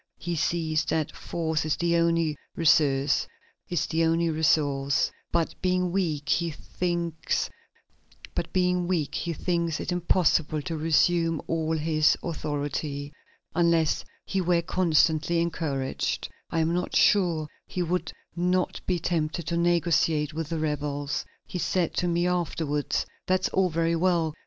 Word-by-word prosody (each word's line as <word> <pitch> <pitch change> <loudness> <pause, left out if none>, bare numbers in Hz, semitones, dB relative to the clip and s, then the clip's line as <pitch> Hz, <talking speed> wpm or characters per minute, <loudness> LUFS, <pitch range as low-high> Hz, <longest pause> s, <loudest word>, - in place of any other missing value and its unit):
He 175 +1 -3
sees 160 -1 0
that 155 -1 -1
force 160 -2 -2
is 155 0 0
the 170 0 +1
only 165 -2 +2 0.2
resource; 145 -4 +3 2.0
but, 170 -1 +1
being 180 -1 +1
weak, 160 -6 -1
he 170 -1 +2
thinks 170 +1 -2 0.9
it 175 -2 -1
impossible 165 -3 +2
to 165 - -3
resume 165 +1 +2
all 160 0 0
his 155 -1 +3
authority.... 145 -2 -3 0.4
Unless 170 -2 +2 0.2
he 195 - -1
were 175 -1 +2
constantly 165 -2 +2
encouraged, 145 -6 -2 0.2
I 165 - 0
am 160 +1 +1
not 180 +1 -2
sure 170 -6 +3 0.2
he 180 - -2
would 180 +2 -1 0.2
not 180 +1 0
be 180 - +1
tempted 165 -1 -1
to 170 - -1
negotiate 165 -3 +2
with 160 -1 -4
the 165 - -2
rebels. 145 -2 -2 0.2
He 180 - -5
said 175 -1 0
to 180 - +1
me 175 0 +1
afterwards: 165 -5 -1 0.2
'That's 185 0 +2
all 190 -1 +2
very 165 0 +1
well! 165 -2 +1
165 Hz, 120 wpm, -27 LUFS, 155-175 Hz, 2.0 s, resource